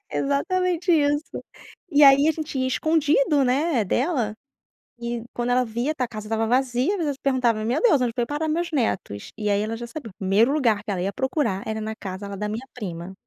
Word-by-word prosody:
Exatamente 355 +5 0
isso. 290 -1 +1 0.5
E 295 -1 +4
aí, 280 +2 +7
a - - +4
gente 310 -3 -5
ia 260 - +1
escondido, 295 0 +2
né, 260 -2 +1
dela, 240 - 0 0.7
e 235 -1 -4
quando 240 0 -1
ela 250 +1 +3
via 240 +7 -2
tá 255 - -1
a - - -9
casa 215 -2 -8
estava 225 0 0
vazia, 255 - +1
às - - -2
vezes 295 -3 0
se - - -28
perguntava: 245 -5 +1
"meu 245 +6 0
Deus, 330 - +4
onde 240 -2 0
foi 240 - 0
parar 295 +4 -2
meus 340 +2 -1
netos?", 195 - -2
e 210 -1 -2
aí 200 0 +2
ela 225 +1 -3
já 240 0 -7
sabia, 235 -5 -8
primeiro 205 +6 +3
lugar 230 -9 +1
que 210 - -4
ela 185 -3 -2
ia 195 +2 -2
procurar 260 -6 -1
era 220 0 -2
na 220 0 -4
casa 195 0 -7
lá 200 - -6
da 210 +2 -3
minha 230 +5 -5
prima 180 -5 -6
250 Hz, 215 wpm, -24 LUFS, 215-290 Hz, 0.7 s, aí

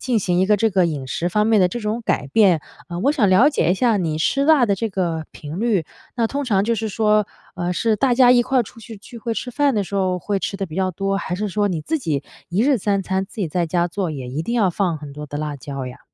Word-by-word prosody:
进 245 -3 +1
行 180 -3 +1
一 190 - +3
个 210 +1 +4
这 225 +2 +2
个 185 -3 +3
饮 145 -5 -4
食 170 +6 -2
方 210 +4 +1
面 220 -2 +4
的 180 - +4
这 240 - -4
种 215 +2 -2
改 145 - -1
变。 180 +2 +4 0.3
呃， 175 -1 -5
我 280 +8 +3
想 220 -9 +2
了 205 +10 +6
解 280 - +1
一 - - +3
下 230 +2 +2
你 160 -4 -1
吃 275 +12 +1
辣 300 -4 +5
的 200 - +2
这 225 +4 -2
个 175 -5 -2
频 155 +5 -7
率， 215 -8 +1 0.3
那 230 -2 +2
通 280 +5 -3
常 200 -6 +2
就 230 +2 +1
是 220 0 -3
说， 210 0 +2 0.3
呃， 175 -1 -2
是 220 +4 +1
大 250 +3 +2
家 245 0 +6
一 245 -1 +6
块 260 +1 +2
儿 - - +2
出 230 +2 -13
去 225 0 -10
聚 235 +4 -12
会 230 +1 -3
吃 250 - -4
饭 280 +1 +1
的 205 -2 0
时 190 - -8
候 185 -2 +1
会 200 +3 -2
吃 195 - -3
得 195 - -2
比 155 - -10
较 185 +1 0
多， 195 +3 -2
还 180 - -3
是 210 +3 -2
说 205 +1 0
你 170 -5 -2
自 320 - -1
己 150 - -2 0.3
一 185 +6 +1
日 275 -1 +3
3 200 -1 0
餐 190 +1 -1
自 - - -19
己 175 - -1
在 170 +2 -1
家 175 +1 +1
做， 185 -1 -2
也 135 -4 -6
一 140 +5 -3
定 235 - -3
要 210 -6 +3
放 175 -2 -1
很 145 -1 -9
多 150 +1 -8
的 145 - -6
辣 150 -1 -3
椒 135 0 -6
呀？ 125 - -10
195 Hz, 310 characters per minute, -21 LUFS, 175-225 Hz, 0.3 s, 了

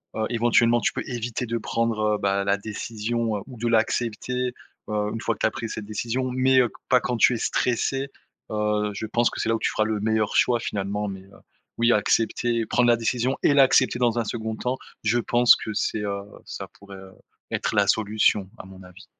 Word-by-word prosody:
heu, 110 - 0
éventuellement 120 0 +3
tu - - 0
peux - - -3
éviter 120 -1 -3
de 115 +1 -1
prendre, 110 -2 0
bah, 100 0 0
la 100 0 +3
décision, 110 +2 -3
heu, - - -6
ou 130 -3 -11
de 120 +2 -2
l'accepter, 120 +2 0 0.4
heu, 105 0 -1
une 115 - -4
fois - - -1
que - - -23
tu - - +1
as - - -2
pris 115 - -5
cette 110 - -6
décision, 120 +4 -2
mais 130 +1 +3
heu, 120 -4 0 0.2
pas 125 -1 +5
quand 125 - -2
tu 125 - +5
es - - -1
stressé, 135 +4 -1 0.4
heu, 105 -1 0
je 105 +2 -5
pense 120 +2 +2
que - - -8
c'est - - -1
là 115 - +3
où - - -3
tu - - 0
feras 110 - +1
le 110 -1 -1
meilleur 110 0 0
choix 120 -1 +3
finalement, 105 -1 -3
mais, 95 -1 -7
heu, 100 +1 -19 0.4
oui, 115 +1 +4
accepter, 115 +2 +1
prendre 120 -1 +3
la 120 - +5
décision 120 +3 -1
et - - +4
l'accepter 130 -2 +4
dans 120 -1 +1
un - - +1
2d 110 0 -4
temps, 125 +4 -2 0.3
je 110 +2 +2
pense 120 0 +5
que 110 - -6
c'est, 105 +1 -1
heu, 100 -1 -3 0.2
ça - - -7
pourrait 100 -1 -11 0.5
être - - -2
la 100 -1 +3
solution 105 -1 +2
à - - -9
mon 95 0 -13
avis. 90 +2 -15
115 Hz, 215 wpm, -24 LUFS, 105-120 Hz, 0.5 s, pas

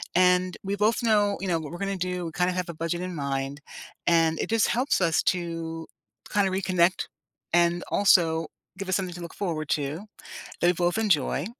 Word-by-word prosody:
and 180 0 +3
we 200 +1 -2
both 220 +3 +2
know, 205 -3 +3
you 195 - -3
know, 170 -2 +1
what 155 -1 -7
we're 175 - -5
gonna 195 0 -2
do, 180 -1 -3
we 165 - -5
kinda 180 +2 0
have 180 -1 -3
a - - -4
budget 165 +2 -3
in 180 -1 -4
mind, 140 0 -3 0.5
and 165 -2 +3
it - - -2
just 225 -1 +3
helps 250 -2 +1
us 165 -3 +3
to 165 -2 -2 0.5
kinda 200 -2 +3
reconnect 185 -1 +1 0.5
and 175 0 +3
also 165 -5 +4 0.3
give 195 -1 -5
us 185 - +2
something 185 -2 -2
to 175 - -8
look 170 - -8
forward 160 -6 -3
to 150 +7 -2 0.6
that 175 - +4
we - - +6
both 175 +3 0
enjoy. 155 -7 +1
175 Hz, 195 wpm, -26 LUFS, 165-190 Hz, 0.6 s, we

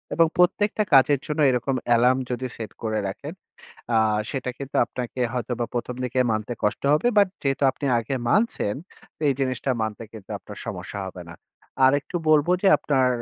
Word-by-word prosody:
এবং 165 - +5
প্রত্যেকটা 205 +4 +2
কাজের 135 +1 +6
জন্য 150 +1 -3
এরকম 130 +2 -1 0.2
alarm 125 +2 +4
যদি 125 +1 -2
সেট 110 -2 -6
করে 110 -1 -1
রাখেন, 140 +11 -6 0.6
আ - - +4 0.3
সেটা 130 -2 -3
কিন্তু 140 0 -5
আপনাকে 125 0 -6
হয়তোবা 120 -1 -2
১ম 120 +1 -3
দিকে 125 +1 0
মানতে 110 +2 -2
কষ্ট 105 - 0
হবে 155 - 0
but 200 -2 +5
যেহেতু 135 0 -1
আপনি 140 - -5
আগে 115 +4 -3 0.2
মানছেন। 210 - +1 0.5
এই - - +4
জিনিসটা 130 0 -1
মানতে 110 0 -4
কিন্তু 105 -4 -12
আপনার - - -11
সমস্যা 100 - -6
হবে 90 -1 -8
না। 85 - -10 0.5
আর 130 - +6
একটু 160 - -6
বলব 155 +1 +4
যে 195 - +5
আপনার 130 -3 +2
130 Hz, 175 wpm, -24 LUFS, 115-145 Hz, 0.6 s, কাজের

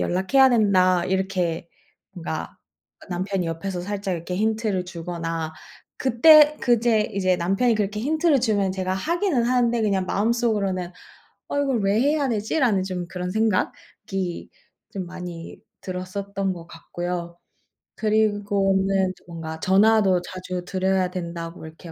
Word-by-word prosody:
연락해야 225 +10 +3
된다." 185 -6 +3
이렇게 185 -3 -1 0.4
뭔가 165 -3 -5 0.4
아 - - -15
남편이 185 0 -2
옆에서 175 +3 -4
살짝 195 0 -3
이렇게 175 +2 -5
힌트를 215 -3 0
주거나 165 -2 -4 0.4
그때 300 +4 +6
그제 235 -3 +2
이제 185 -2 +1
남편이 195 +8 +1
그렇게 210 0 -2
힌트를 310 +1 +2
주면 205 -5 +1
제가 185 0 -2
하기는 335 - 0
하는데 240 -1 +2
그냥 195 -3 +1
마음속으로는 205 -5 0 0.6
'어 285 - -1
,이걸 265 -6 0
왜 200 +3 +2
해야 285 -1 +2
되지?' 220 +7 -1
라는 210 -8 +2
좀 180 -2 -4
그런 180 +1 -4
생각이 195 -3 -2 0.4
좀 190 -2 -4
많이 175 -2 -8 0.2
들었었던 195 +1 -3
것 170 -1 -11
같고요. 175 +1 -5 0.6
그리고는 200 -3 +1
뭔가 165 -2 -6
전화도 195 -1 +4
자주 185 0 -6
드려야 190 0 0
된다고 170 -2 -6
이렇게 160 +1 -11
190 Hz, 300 characters per minute, -23 LUFS, 180-220 Hz, 0.6 s, 그때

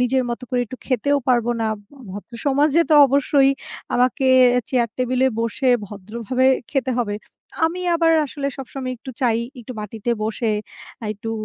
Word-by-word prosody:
নিজের 255 +1 +2
মতো 235 - -4
করে 250 - +1
একটু 255 - -8
খেতেও 280 +3 +1
পারবো 240 -2 +3
না।" 225 - +1
ভ - - -17 0.3
ভদ্রসমাজে 275 - 0
তো - - +6
অবশ্যই 275 0 +3 0.4
আমাকে 255 +2 +2 0.3
এ - - +2
চেয়ার 240 -3 +2
টেবিলে 255 +1 +1
বসে 230 +4 -2 0.2
ভদ্রভাবে 215 +6 -3 0.3
খেতে 265 -2 0
হবে। 205 -3 -2 0.5
আমি 350 +3 -4
আবার 330 -1 +3
আসলে 280 0 -5
সবসময় 260 -1 -5
একটু 255 +3 -9
চাই 235 -3 +2 0.2
একটু 240 +2 -8
মাটিতে 215 +2 -4
বসে, 220 +1 -1 0.5
আ - - -5
একটু 215 +2 -6
250 Hz, 155 wpm, -21 LUFS, 230-270 Hz, 0.5 s, তো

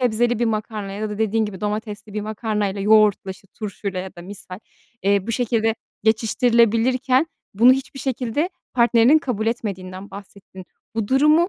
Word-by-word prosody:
sebzeli 240 -1 +1
bir 240 - +1
makarna 215 -2 -3
ya 210 +2 -4
da 210 - -6
dediğin 220 0 +1
gibi 200 -3 -6
domatesli 210 0 -4
bir 210 - -1
makarnayla 210 -2 -2
yoğurtla, 210 -1 +4
işte, 190 +1 -11
turşuyla 200 -2 -5
ya 190 +1 -8
da 175 - -9
misal, 185 -1 -9 0.4
eee, 200 0 +2
bu 230 - -2
şekilde 225 -2 +1 0.3
geçiştirilebilirken 235 +4 +2 0.3
bunu 235 +5 +7
hiçbir 270 +1 -4
şekilde 265 +4 -1 0.3
partnerinin 240 +4 +5
kabul 235 -8 -3
etmediğinden 195 -4 -4
bahsettin. 195 -1 -12 0.3
Bu 220 -2 -2
durumu 300 +6 +4
220 Hz, 150 wpm, -22 LUFS, 200-240 Hz, 0.4 s, bunu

